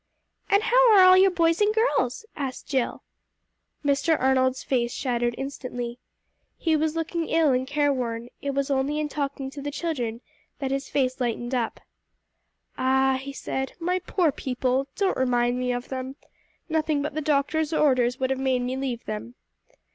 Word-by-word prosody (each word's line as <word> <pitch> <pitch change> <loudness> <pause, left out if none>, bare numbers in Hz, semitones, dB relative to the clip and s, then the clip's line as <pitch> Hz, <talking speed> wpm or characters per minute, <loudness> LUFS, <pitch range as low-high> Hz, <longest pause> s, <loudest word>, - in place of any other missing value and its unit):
"And 400 +1 +4
how - - +5
are 380 - +8
all 370 0 +8
your 380 +1 +6
boys 335 0 +2
and 420 +1 +3
girls?" 445 - +1
asked 270 -3 -5
Jill. 265 -4 -1 0.8
Mr. 285 +3 +2
Arnold's 260 0 +2
face 240 -3 0
shadowed 240 -2 -1
instantly. 250 -3 -5 0.6
He 325 -2 +1
was 310 +1 0
looking 330 0 -2
ill 320 -3 +3
and 255 0 0
careworn; 255 -5 -1
it 280 -1 -3
was 275 0 0
only 275 +2 0
in 305 -1 -1
talking 280 -2 -3
to 285 - -8
the 290 - -3
children 255 -7 -3 0.4
that 270 -2 -3
his 275 +1 -2
face 260 -2 0
lightened 240 +1 -2
up. 245 -3 -2 1.0
"Ah," 265 0 +3
he 275 +1 -6
said; 265 -1 -4
"my 360 +2 0
poor 355 -2 +1
people! 260 0 -1
Don't 390 -2 +1
remind 245 -1 +1
me 250 0 0
of 245 0 -4
them. 260 0 -5 0.5
Nothing 310 -3 0
but 300 - -3
the 310 - -2
doctor's 300 +2 +1
orders 255 -5 +2
would 260 0 0
have 265 - -1
made 260 -2 +1
me 250 +1 -2
leave 260 -3 -3
them." 215 +3 -6
270 Hz, 170 wpm, -25 LUFS, 255-310 Hz, 1.0 s, are